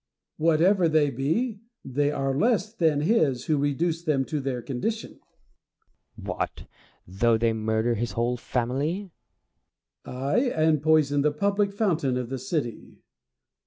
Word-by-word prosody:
Whatever 165 +3 +3
they 155 -2 +3
be, 200 - -1 0.3
they 145 +2 0
are 135 -2 -1
less 215 - +1
than 160 -8 +2
his 150 - +2
who 155 -2 +1
reduced 160 +4 -1
them 135 -3 +2
to 150 - -3
their 135 -2 -3
condition. 215 - -4 1.0
Plato. - - -5
What! - - -4 0.4
though 110 +5 +2
they 115 0 +1
murder 110 +1 0
his 115 +1 -3
whole 120 +1 0
family? 140 +12 -2 0.9
Diogenes. 140 - -1
Aj, - - -10
and 155 -2 +3
poison 150 -2 +3
the 150 +1 +2
public 200 +6 0
fountain 170 - 0
of 125 -2 -4
the 135 0 -4
city. 130 -4 -4
145 Hz, 140 wpm, -26 LUFS, 125-170 Hz, 1.0 s, Whatever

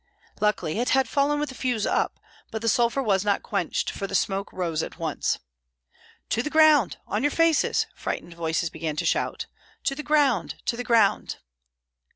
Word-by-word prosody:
Luckily 210 -4 0
it 245 - 0
had 265 -1 +3
fallen 285 +4 +1
with 295 - -2
the - - -7
fuse 245 -5 -1
up; - - 0 0.3
but 220 0 -5
the - - -1
sulphur 240 +4 +2
was 195 -4 +2
not 205 -1 +1
quenched, - - -1
for 195 - -4
the 195 - -4
smoke 195 0 0
rose 170 -4 -2
at - - -6
once. 165 -3 -1 0.9
"To 230 - +1
the 300 - -3
ground! 310 - +5
on 210 - -2
your 290 - +3
faces!" 330 0 +2
frightened 170 - -5
voices 165 0 -1
began 155 -2 -4
to - - -2
shout. - - 0 0.4
"To 275 - +1
the 285 - -5
ground, 295 -2 +2
to 235 - 0
the 245 - -4
ground!" 230 -4 +2
230 Hz, 185 wpm, -25 LUFS, 190-275 Hz, 0.9 s, ground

